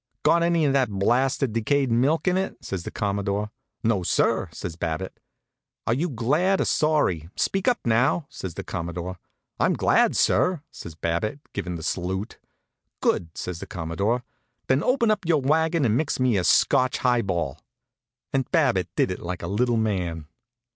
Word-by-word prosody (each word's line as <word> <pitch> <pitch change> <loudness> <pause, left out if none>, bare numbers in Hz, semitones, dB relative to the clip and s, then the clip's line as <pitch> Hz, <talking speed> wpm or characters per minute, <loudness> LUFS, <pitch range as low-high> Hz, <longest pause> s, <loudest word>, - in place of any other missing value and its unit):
"Got 170 - +4
any 170 -2 +2
of 140 - +2
that 135 -4 +2
blasted 120 +5 +1
decayed 130 +3 +1
milk 135 +10 +2
in 180 - +3
it?" 190 +1 -2
says 95 -3 -3
the - - -6
Commodore. 100 0 -2 0.3
"No, 110 -4 +2
sir," 90 - +1
says 85 - -6
Babbitt. 85 +2 -4 0.7
"Are 115 - +2
you 160 +8 0
glad 150 - +1
or - - +1
sorry? 145 - +1
Speak 195 0 0
up, 245 -1 +4
now," 130 +8 +2
says 95 -9 -7
the - - -5
Commodore. 85 +2 -5 0.4
"I'm - - +3
glad, - - +3
sir," 180 -5 +2
says 80 - -9
Babbitt, 85 - -2
givin' 90 -1 -3
the 80 - -7
salute. 95 +5 -3 0.6
"Good!" 85 - +1
says 90 -2 -4
the - - -8
Commodore. 100 +7 -1 0.4
"Then 130 +2 +2
open 235 +1 +2
up 210 -1 0
your 165 -3 +4
wagon 160 +2 +2
and 110 -2 +2
mix 140 +2 0
me 130 -3 +3
a 95 - +1
Scotch 130 +8 +3
high 125 -2 +2
ball." 85 -8 -2 0.7
And 135 -1 0
Babbitt 130 - +2
did - - +2
it - - -4
like 90 +1 -5
a - - -3
little 115 +5 +1
man. 90 -8 -1
115 Hz, 170 wpm, -25 LUFS, 90-145 Hz, 0.7 s, Got